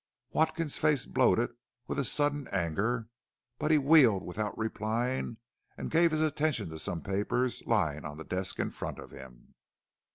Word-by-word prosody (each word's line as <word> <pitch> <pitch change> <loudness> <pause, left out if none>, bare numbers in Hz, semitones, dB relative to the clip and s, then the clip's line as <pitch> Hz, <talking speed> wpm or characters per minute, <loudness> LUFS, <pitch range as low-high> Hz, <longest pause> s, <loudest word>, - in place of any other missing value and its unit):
Watkins's 160 -1 +1
face 150 -4 +2
bloated 120 -2 +2 0.3
with - - -3
a - - +2
sudden 145 +1 +1
anger, 100 +6 -1 0.5
but 150 - 0
he 155 - +6
wheeled 135 -9 +5
without 105 +4 -3
replying 115 +2 -2 0.4
and - - -5
gave 170 +1 +5
his 155 -1 0
attention 150 - 0
to 80 - -7
some 85 0 -3
papers 105 +6 -1
lying 80 -10 +1
on 75 0 -7
the 80 - -7
desk 90 +3 -3
in - - -1
front - - -5
of - - -10
him. 65 -2 -13
115 Hz, 160 wpm, -30 LUFS, 95-145 Hz, 0.5 s, he